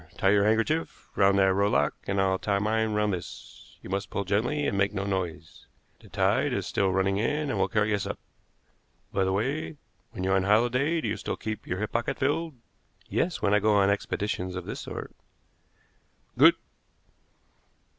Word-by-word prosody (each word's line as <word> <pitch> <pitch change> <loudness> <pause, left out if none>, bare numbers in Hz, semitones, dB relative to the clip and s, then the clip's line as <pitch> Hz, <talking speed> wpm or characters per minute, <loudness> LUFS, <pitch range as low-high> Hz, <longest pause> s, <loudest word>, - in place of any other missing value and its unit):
Tie 95 - +3
your 100 0 +4
handkerchief 115 +10 0
round 100 0 +4
that 95 -1 +4
rowlock, 95 -8 +2
and 100 0 0
I'll 95 -1 +2
tie 100 -1 0
mine 110 +2 0
round 105 -1 +1
this. 90 - -9
You - - -9
must 100 +1 -2
pull 100 - -2
gently 120 +10 0
and - - 0
make 100 +1 +1
no 95 - -1
noise. 85 -5 -4 0.3
The - - -17
tide - - +1
is - - -2
still 95 -1 0
running 95 +1 +1
in, 145 +6 0
and - - -2
will - - +2
carry 105 -1 +1
us 100 - -1
up. - - -4 1.0
By 95 - +2
the 95 - 0
way, 135 +10 -2 0.3
when 90 - -6
you're 95 +1 +2
on 95 -1 +1
holiday 125 +10 +2
do - - -3
you - - -2
still - - -4
keep 110 -1 -5
your 90 - -2
hip 105 +2 -3
pocket 120 +4 -1
filled?" 150 +3 -1 0.5
"Yes, 175 0 -1
when 100 - +3
I 105 - +5
go 105 0 +3
on 100 0 +4
expeditions 100 -2 -2
of 90 - -5
this - - -5
sort." - - -7 1.2
"Good! - - +7
100 Hz, 185 wpm, -27 LUFS, 95-115 Hz, 1.2 s, Good